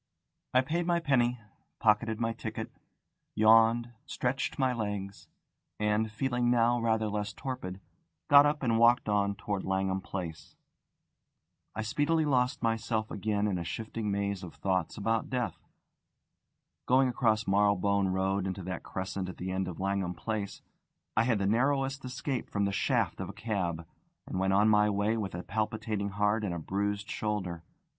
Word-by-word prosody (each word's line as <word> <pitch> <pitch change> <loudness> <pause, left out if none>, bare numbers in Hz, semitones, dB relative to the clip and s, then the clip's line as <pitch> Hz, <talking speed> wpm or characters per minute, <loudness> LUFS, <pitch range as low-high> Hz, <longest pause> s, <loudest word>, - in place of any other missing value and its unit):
I 130 - +7
paid 165 +6 -1
my 170 -1 +3
penny, 125 -6 +2 0.4
pocketed 110 0 +2
my 115 -1 0
ticket, - - -5 0.6
yawned, 115 +2 +5 0.2
stretched 130 +1 -2
my 130 -2 +2
legs, 105 -3 -4 0.5
and, 105 +1 +1
feeling 120 +1 0
now 120 0 +3
rather 110 -1 +1
less 105 0 -3
torpid, 95 -9 -5 0.5
got 145 0 +9
up 145 -1 -1
and 115 -2 +2
walked 120 +2 +5
on 100 -1 +1
towards 100 -1 -3
Langham 95 0 0
Place. 85 -5 -6 1.2
I 110 - -2
speedily 150 +8 +1
lost 130 -1 +1
myself 110 -1 0
again 105 0 -1
in 95 -4 0
a - - -3
shifting 110 +4 -4
maze 100 -1 -1
of 90 -4 -9
thoughts 95 -4 -1
about 110 +2 0
death. 125 -3 -3 1.2
Going 130 +1 +5
across 110 -4 +1
Marylebone 100 0 +3
Road 95 +1 0
into 95 0 -4
that 90 -1 -4
crescent 95 0 -4
at 95 - -8
the 95 +1 -4
end 95 0 -1
of 90 - -6
Langham 95 -2 -1
Place, 110 -3 -4 0.5
I 115 - +3
had 115 -3 +2
the 100 - -1
narrowest 135 +5 +1
escape 130 0 -3
from 100 -1 0
the 100 - 0
shaft 100 - 0
of - - -4
a - - -7
cab, 90 -7 -2 0.4
and 95 - -4
went 95 0 +2
on 100 +2 +4
my 105 -1 +5
way 105 +2 +1
with 100 -5 -3
a 90 - -5
palpitating 110 -1 -2
heart 105 +2 +1
and 90 -4 -2
a - - -3
bruised 100 +4 -2
shoulder. 95 -6 -3
105 Hz, 160 wpm, -30 LUFS, 100-120 Hz, 1.2 s, got